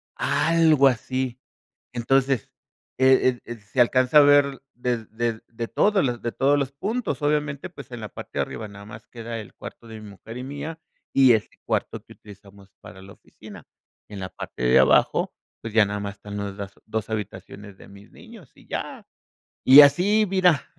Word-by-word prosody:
algo 160 -4 +3
así. 130 0 -2 0.5
Entonces, 130 0 0 0.5
el 130 0 +5
ed 125 -1 +2
ed 120 -1 -8
se 110 +5 -1
alcanza 130 +3 +3
a - - +9
ver 145 -1 +4
de 120 -2 -3
de 115 0 -3
de 115 0 -6
todos 140 - +1
de 120 - -3
todos 140 +4 +2
los 135 -1 -2
puntos. 215 - -3
Obviamente, 150 +2 -1
pues 140 -6 -13
en 120 - -7
la 105 - -7
parte - - -10
de - - +3
arriba 110 - -5
nada 100 0 -12
más 105 +1 -12
queda 115 -1 -7
el 105 - -11
cuarto 115 - -11
de 110 -1 -9
mi 105 - -11
mujer 110 +4 -11
y 125 - -6
mía 145 +4 -7 0.3
y 130 -3 +6
ese 110 - -1 0.2
cuarto - - -2
que - - -16
utilizamos 100 -1 -16
para 90 +2 -13
la 100 +1 -13
oficina. 100 -8 -15 0.4
En 105 -2 -8
la 95 -1 -5
parte 60 - -8
de 60 0 +5
abajo, - - +3 0.3
pues 115 -2 -7
ya 110 -1 +5
nada 105 0 -4
más 100 0 -6
están 105 0 -9 0.2
las 100 -1 -7
dos 110 -1 -4
habitaciones 105 -1 -7
de - - -15
mis 100 +1 -16
niños 225 - -15
y - - -21
ya, - - -6 0.6
y 135 +3 +10
así, 190 +10 +4
mira, 180 -5 +2
120 Hz, 185 wpm, -24 LUFS, 105-140 Hz, 0.6 s, y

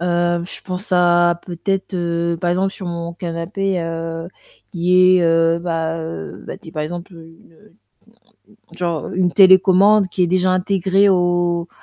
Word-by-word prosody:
Heu, 175 0 0
je 175 - -9
pense 185 +2 -7
à 175 -1 +3
peut-être, 190 +2 -3
heu, 170 -1 -1
par 175 - 0
exemple 190 +2 0
sur 190 - -8
mon 170 0 -5
canapé, 175 +2 -3
heu, 165 0 -5 0.4
qui 185 +1 +4
est, - - +1
heu 165 0 +2
bah, 165 -1 -2
heu, 85 - -7
bah - - -7
dit, 160 - -14
par 155 - -3
exemple, 175 +4 -7
une, 165 0 -16
heu, 210 +6 -23 1.0
genre, 170 -4 -3
une 180 -1 0
télécommande 190 +1 +5
qui 180 +1 -2
est - - +3
déjà 185 +1 +1
intégrée 190 +1 +1
au 175 -2 +1
175 Hz, 155 wpm, -19 LUFS, 170-185 Hz, 1.0 s, télécommande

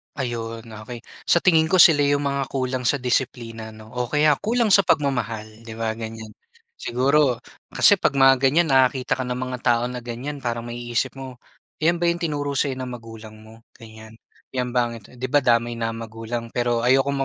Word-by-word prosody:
Ayun, 115 -3 -4
okey. 115 +1 -10 0.2
Sa 170 - +3
tingin 160 -3 +4
ko, 185 - +1
sila 165 -4 +7
yung 145 0 +2
mga 140 -1 -1
kulang 130 -2 -2
sa - - +3
disiplina 120 -3 -2
'no. 110 0 -14
O 125 0 -3
kaya, 150 +3 +3
kulang 230 0 +1
sa 195 - +7
pagmamahal, 125 - 0 0.2
'di 110 - -7
ba 115 0 -2
ganyan? 110 -1 -7 0.5
Siguro 130 0 +1 0.2
kasi, 205 -2 +4
'pag 140 - +1
mga 135 -1 +5
ganyan 145 +4 +3
nakakita 130 -1 +2
ka 130 - -2
ng 125 - -2
mga 130 0 -4
tao 120 -1 +2
na 125 - -5
ganyan 125 +5 -6
parang 120 -2 -3
maiisip 120 +2 -3
mo, 130 -1 -8 0.5
"Yan 170 +1 +2
ba 175 - +1
yung 170 0 0
tinuro 145 -3 -2
sa'yo 135 -1 0
ng 125 -1 -5
magulang 115 -2 -11
mo?"ganyan, 110 0 -15 0.4
"Yan 125 -1 -1
ba?" 120 -1 +1 0.2
Di 125 +4 -7
ba 145 +1 +2
damay 120 -1 +2
na 115 0 -2
magulang. 115 +1 -6
Pero, 120 0 -1
ayokong 135 +4 +3
125 Hz, 180 wpm, -23 LUFS, 115-140 Hz, 0.5 s, sila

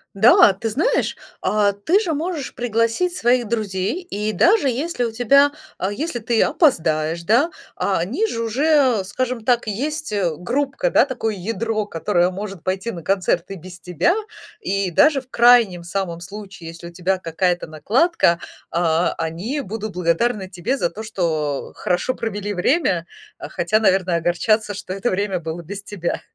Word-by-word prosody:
Да, 210 0 +7
ты 220 +4 -4
знаешь, 345 - 0 0.3
а, 205 -1 +2
ты 205 - +1
же 360 -7 -2
можешь 310 -2 -3
пригласить 235 - 0
своих 240 -6 +2
друзей, 205 - -2
и 215 - -3
даже 360 -5 +4
если 255 0 -1
у 230 - -3
тебя 275 +5 +4 0.3
а, 190 - -1
если 250 +3 -3
ты 225 +1 +1
опоздаешь, 165 - +1
да, 240 - +3 0.3
а 195 -4 0
они 260 - 0
же 230 - -3
уже, 260 -2 +2
скажем 240 +2 -3
так, 240 -3 +2
есть, 295 +5 -3
э, 180 -6 0
группка, 275 - -1
да, - - +5
такое 230 -5 -3
ядро, 215 +2 -2
которое 175 0 +1
может 195 -2 -6
пойти 190 +4 -2
на 170 -5 -8
концерт 185 -2 +1
и 195 - -4
без 180 +1 -11
тебя, 180 - +1 0.5
и 195 - -1
даже 290 - +4
в 255 - -25
крайнем 235 -8 +5
самом 170 -1 -3
случае, 195 -2 -9
если 170 +1 -10
у 170 - -17
тебя 185 +2 0
какая-то 175 +1 -1
накладка, 200 - +2 0.3
а, 170 0 +1
они 175 - -3
будут 215 -2 -5
благодарны 190 +3 0
тебе 190 +9 -2
за 175 - 0
то, 210 +6 -8
что 160 -9 -2
хорошо 180 +8 -1
провели 205 -2 -3
время. 180 - +1 0.3
Э, - - -6
хотя, 210 +6 +1
наверное, 185 -4 +2
огорчатся, 205 +6 +1
что 190 - -7
это 195 +6 -1
время 195 -1 -1
было 160 +1 -5
без 200 +5 -7
тебя. 190 -5 -4
205 Hz, 165 wpm, -21 LUFS, 180-245 Hz, 0.5 s, Да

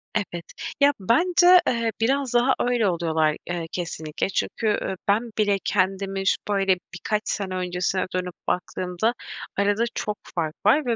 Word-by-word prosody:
Evet, 175 -5 -2 0.3
ya 285 0 +5
bence, 350 - +5
eee, 230 -2 +1
biraz 265 +1 +1
daha 245 +2 +4
öyle 245 -4 +2
oluyorlar, 160 -3 +1
eee, 170 -2 -3
kesinlikle. 160 -2 -3
Çünkü 220 +3 -1
ü 195 -2 0
ben 220 +3 +1
bile 205 -2 +2
kendimi 195 0 0
şu - - +5
böyle 195 -2 +2 0.2
birkaç 210 +4 -1
sene 190 -2 -2
öncesine 180 +1 -1
dönüp 180 -1 -3
baktığımda 180 +4 -1 0.4
arada 205 +3 +2
çok 210 0 -2 0.2
fark 160 -2 -1
var 270 +7 +5
ve 235 -2 +1
200 Hz, 150 wpm, -24 LUFS, 180-230 Hz, 0.4 s, ya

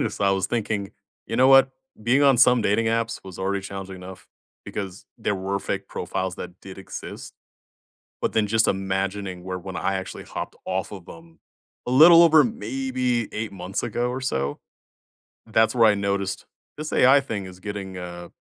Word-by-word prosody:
Just, - - -2
I 100 - +3
was 95 -1 +1
thinking, 105 -4 -2 0.3
"You - - -3
know 130 +1 +5
what? 135 0 +7 0.3
Being 120 +6 +3
on 135 -2 +6
some 125 -1 +5
dating 105 +2 +2
apps 115 0 -1
was 95 -2 -10
already 95 +1 -1
challenging 95 -1 -7
enough 90 0 -11 0.4
because 95 -2 -6
there 105 - -1
were 95 +1 -2
fake - - -4
profiles 95 -2 -3
that 90 - -9
did 95 0 -11
exist," 95 - -8 0.9
but - - -1
then 110 -1 +2
just 110 +2 +2
imagining 95 -1 -2
where 95 0 -4
when 95 0 -7
I 95 - -1
actually 95 -1 -5
hopped - - -6
off 95 +2 -2
of 95 -4 -10
'em 80 -1 -14 0.5
a - - -2
little 165 +6 +9
over 160 -3 +7
maybe 125 0 -2
8 110 -1 -4
months 95 0 -4
ago 120 +1 -1
or 130 +1 -4
so, 70 - -2 0.9
that's 110 +1 +2
where 115 -2 +5
I 105 - +3
noticed, 100 -1 -2 0.3
"This 155 0 -5
AI 130 +3 +6
thing 105 -7 -4
is 90 -1 -11
getting, 95 -2 -6
uh, 85 -1 -8
100 Hz, 180 wpm, -24 LUFS, 95-120 Hz, 0.9 s, little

